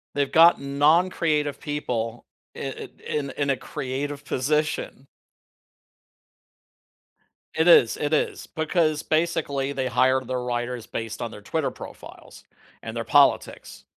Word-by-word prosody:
They've 140 Hz, -1 st, 0 dB
got 165 Hz, -2 st, +6 dB
non-creative 150 Hz, +1 st, +2 dB
people 120 Hz, -6 st, -3 dB, 0.3 s
i -, -, -9 dB
i -, -, -6 dB, 0.2 s
in 140 Hz, -2 st, -2 dB
in 140 Hz, -1 st, -2 dB
a 135 Hz, -, +2 dB
creative 140 Hz, +4 st, -5 dB
position. 145 Hz, 0 st, -1 dB, 2.5 s
It 160 Hz, +2 st, +2 dB
is, 125 Hz, -9 st, +6 dB
it 150 Hz, +1 st, -2 dB
is, -, -, -1 dB
because 160 Hz, -1 st, 0 dB
basically, 155 Hz, -4 st, 0 dB
they 135 Hz, -2 st, -2 dB
hired 130 Hz, +1 st, +2 dB
their 130 Hz, -1 st, -2 dB
writers 120 Hz, -1 st, -3 dB
based 115 Hz, +1 st, -5 dB
on 120 Hz, -, -3 dB
their 105 Hz, -, -11 dB
Twitter 155 Hz, +6 st, -2 dB
profiles, -, -, -12 dB, 0.4 s
and -, -, -7 dB
their -, -, -2 dB
politics, -, -, +2 dB
140 Hz, 125 wpm, -24 LUFS, 130-155 Hz, 2.5 s, got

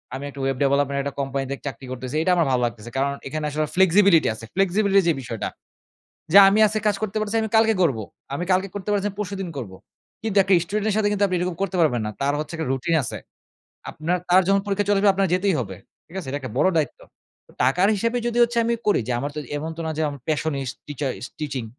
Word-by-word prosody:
আমি 135 Hz, -, -6 dB
একটু 140 Hz, -, -11 dB
web 135 Hz, -1 st, 0 dB
development 140 Hz, 0 st, +1 dB
একটা 140 Hz, 0 st, -4 dB
কোম্পানিতে 135 Hz, 0 st, -2 dB
চাকরি 135 Hz, -1 st, -7 dB
করতেছি 130 Hz, +1 st, -5 dB
এটা 185 Hz, -, +2 dB
আমার 170 Hz, -2 st, +3 dB
ভালো 125 Hz, -1 st, +2 dB
লাগতেছে। 115 Hz, -1 st, -5 dB
কারণ 140 Hz, +1 st, +1 dB, 0.2 s
এখানে 155 Hz, +2 st, -3 dB
আসলে 155 Hz, +1 st, -1 dB
flexibility 190 Hz, -1 st, +5 dB
আছে 110 Hz, +1 st, -10 dB
flexibility 195 Hz, +1 st, +3 dB
র -, -, -6 dB
যে -, -, +4 dB
বিষয়টা। 115 Hz, -4 st, -4 dB, 0.8 s
যে, 195 Hz, -, +8 dB
"আমি 205 Hz, +2 st, +2 dB
আজকে 215 Hz, +1 st, -2 dB
কাজ 205 Hz, -, +2 dB
করতে 215 Hz, -1 st, -3 dB
পারতেছি 215 Hz, +1 st, -2 dB
না -, -, +2 dB
আমি 220 Hz, -, -4 dB
কালকে 225 Hz, 0 st, +4 dB
করব। 150 Hz, -9 st, +2 dB, 0.4 s
আমি 145 Hz, -, -2 dB
কালকে 185 Hz, +1 st, +2 dB
করতে 205 Hz, 0 st, -5 dB
পারছি 205 Hz, -1 st, +1 dB
না -, -, -1 dB
আমি -, -, -19 dB
পরশুদিন 195 Hz, -2 st, -4 dB
করবো।" 105 Hz, -8 st, -6 dB, 0.5 s
কিন্তু 215 Hz, -2 st, -1 dB
একটা 190 Hz, 0 st, +2 dB
স্টুডেন্ট 210 Hz, +3 st, -2 dB
এর -, -, 0 dB
সাথে 215 Hz, -1 st, +2 dB
কিন্তু 205 Hz, 0 st, +1 dB
আপনি 185 Hz, -, -1 dB
এরকম 180 Hz, 0 st, -2 dB
করতে 195 Hz, -1 st, -1 dB
পারবেন 125 Hz, -8 st, +2 dB
না -, -, -2 dB
তার 140 Hz, +1 st, +1 dB
হচ্ছে 155 Hz, +2 st, -5 dB
একটা 160 Hz, -4 st, -3 dB
রুটিন 135 Hz, +5 st, 0 dB
আছে। 115 Hz, -, -4 dB, 0.7 s
আপনার 165 Hz, +4 st, -1 dB
তার 180 Hz, +1 st, +6 dB
যখন 195 Hz, 0 st, +4 dB
পরীক্ষা 205 Hz, 0 st, 0 dB
চলে 205 Hz, -1 st, +3 dB
আসবে 205 Hz, 0 st, +5 dB
আপনার 195 Hz, 0 st, +1 dB
যেতেই 185 Hz, +1 st, +1 dB
হবে। 95 Hz, -6 st, -5 dB, 0.3 s
ঠিক 170 Hz, -, -12 dB
আছে? 175 Hz, -, -6 dB
এটা 140 Hz, -, -2 dB
একটা 130 Hz, -5 st, -7 dB
বড় -, -, +4 dB
দায়িত্ব। 155 Hz, -2 st, 0 dB, 0.5 s
তো -, -, -21 dB
টাকার 175 Hz, +10 st, +3 dB
হিসাবে 230 Hz, +4 st, 0 dB
যদি 240 Hz, 0 st, -1 dB
হচ্ছে 235 Hz, 0 st, +2 dB
আমি 235 Hz, +1 st, +1 dB
করি 210 Hz, -, +3 dB
যে -, -, +1 dB
আমার 140 Hz, +4 st, -3 dB
তো -, -, -2 dB, 0.2 s
এমন 155 Hz, +2 st, -4 dB
তো -, -, -7 dB
না -, -, -2 dB
যে -, -, +1 dB, 0.3 s
passionist 145 Hz, -4 st, -1 dB
টিচারিস্ট 135 Hz, -3 st, -4 dB
টিচিং। 135 Hz, -5 st, -3 dB
165 Hz, 240 wpm, -23 LUFS, 135-200 Hz, 0.8 s, যে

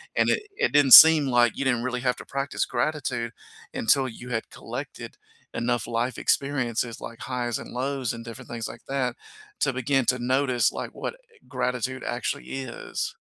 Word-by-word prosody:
And -, -, +2 dB
it 440 Hz, -, +1 dB
it -, -, +1 dB
didn't 145 Hz, -2 st, +4 dB
seem 160 Hz, -2 st, +11 dB
like 120 Hz, -3 st, +3 dB
you 140 Hz, -, -2 dB
didn't 120 Hz, -3 st, +1 dB
really 125 Hz, -1 st, -2 dB
have 125 Hz, 0 st, +1 dB
to -, -, -10 dB
practice 140 Hz, 0 st, -2 dB
gratitude 125 Hz, -6 st, -2 dB, 0.4 s
until 135 Hz, +3 st, +2 dB
you 125 Hz, +1 st, -9 dB
had 115 Hz, -2 st, -3 dB
collected -, -, -8 dB, 0.4 s
enough 120 Hz, 0 st, -1 dB
life 120 Hz, +2 st, -2 dB
experiences 120 Hz, -4 st, -1 dB
like 115 Hz, 0 st, -8 dB
highs 120 Hz, -3 st, -2 dB
and -, -, -10 dB
lows 130 Hz, -1 st, -2 dB
and 115 Hz, 0 st, -8 dB
different 115 Hz, +2 st, -10 dB
things 115 Hz, -1 st, -4 dB
like -, -, -11 dB
that 130 Hz, -3 st, -1 dB, 0.5 s
to 135 Hz, -, +2 dB
begin 130 Hz, 0 st, +1 dB
to 125 Hz, -, +1 dB
notice, 130 Hz, 0 st, +1 dB
like, -, -, -6 dB
what -, -, -5 dB, 0.3 s
gratitude 125 Hz, 0 st, -2 dB
actually 120 Hz, +1 st, -3 dB
is. 125 Hz, -3 st, -5 dB
125 Hz, 175 wpm, -25 LUFS, 120-135 Hz, 0.5 s, seem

